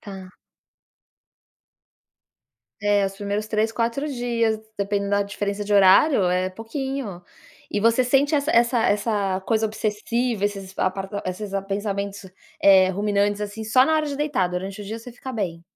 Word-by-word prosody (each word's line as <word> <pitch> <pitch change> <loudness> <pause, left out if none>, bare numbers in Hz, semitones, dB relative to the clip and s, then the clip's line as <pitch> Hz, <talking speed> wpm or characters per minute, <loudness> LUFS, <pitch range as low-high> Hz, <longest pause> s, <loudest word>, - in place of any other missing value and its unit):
Tá. 190 -2 -9 2.5
É, 205 -1 +3
os 195 - -3
primeiros 205 +1 -3
3, 220 +1 0
4 235 +5 -1
dias 235 -4 0 0.2
dependendo 200 0 -1
da 200 0 +3
diferença 205 0 -4
de 205 - -1
horário 200 +6 +6
é 185 +1 0
pouquinho. 225 -2 -5 0.5
E - - -2
você 230 +3 +4
sente 280 +4 +2
essa 290 +1 +1
essa 235 +1 +3
essa 205 -2 0
coisa 220 +2 +1
obsessiva, 220 +1 -1
esses 195 -2 -5
a 185 - +3
par 195 +1 -6 0.2
esses 195 +2 -5
a 195 - 0
pensamentos, 200 0 -4 0.4
eh, 190 -1 +7
ruminantes, 205 +1 0
assim, 210 +2 -5
só 255 +4 +5
na 315 - +2
hora 310 -1 +1
de 285 - -4
deitar, 280 -10 0
durante 190 +3 -5
o - - -8
dia 220 +3 -5
você 235 +2 -10
fica 260 +2 -8
bem? 175 -6 -3
205 Hz, 160 wpm, -23 LUFS, 195-230 Hz, 2.5 s, eh